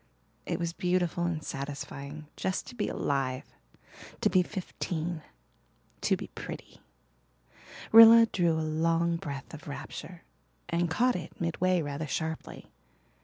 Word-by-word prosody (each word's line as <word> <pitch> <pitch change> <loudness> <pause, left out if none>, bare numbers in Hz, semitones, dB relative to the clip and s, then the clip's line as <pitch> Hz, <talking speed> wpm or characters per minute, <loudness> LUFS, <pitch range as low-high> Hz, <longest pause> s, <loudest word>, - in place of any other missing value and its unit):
It - - -1
was 170 -1 -2
beautiful 175 -1 0
and 165 -3 -2
satisfying 140 +1 -6
just 185 - -2
to - - -10
be 215 - -1
alive 135 -2 -1 0.8
to - - +3
be 185 - +5
fifteen 175 -3 -4 0.8
to - - +2
be - - -6
pretty. - - -8 1.1
Rilla 230 +1 +10
drew 175 -6 +1
a 160 0 -1
long 165 +2 +1
breath 140 -3 -7
of 155 - -10
rapture 165 +4 -7 0.4
and 170 0 0
caught 245 +9 +2
it 170 -2 -7
midway 175 +1 +1
rather 145 +1 -4
sharply. 160 +2 -4
170 Hz, 125 wpm, -29 LUFS, 155-180 Hz, 1.1 s, Rilla